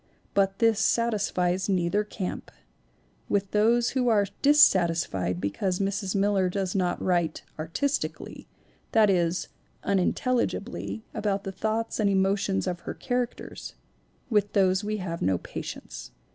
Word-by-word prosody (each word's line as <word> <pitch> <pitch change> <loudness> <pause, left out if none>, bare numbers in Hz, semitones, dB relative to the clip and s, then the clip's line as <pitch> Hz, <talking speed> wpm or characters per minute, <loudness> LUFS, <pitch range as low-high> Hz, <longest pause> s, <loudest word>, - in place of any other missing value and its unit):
But 195 -1 +2
this 225 -2 +3
satis 220 -2 +1
fies 180 +2 0
neither 185 +2 +1
camp. 205 -3 -5 0.8
With 200 -1 0
those 230 +3 +3
who 255 -2 0
are 210 -3 +4 0.2
dissatisfied 170 - +4
because 140 - -1
Mrs. 195 0 -2
Miller 195 -2 +2
does 190 0 -2
not 180 -3 0
write 175 -3 0 0.2
"artistically" 170 - -3 0.5
(that 215 -2 +5
is, 175 -1 0 0.3
unintelligibly) 220 +3 -1
about 205 -2 -1
the 195 - -4
thoughts 220 +4 -2
and 210 -2 +3
emotions 195 0 +1
of 180 -2 -2
her - - -6
characters 245 -1 -4 0.5
with 210 -4 +1
those 190 0 +3
we 215 +1 -2
have 175 -4 -5
no 95 -1 +2
patience. 60 -6 -7
195 Hz, 130 wpm, -27 LUFS, 180-215 Hz, 0.8 s, that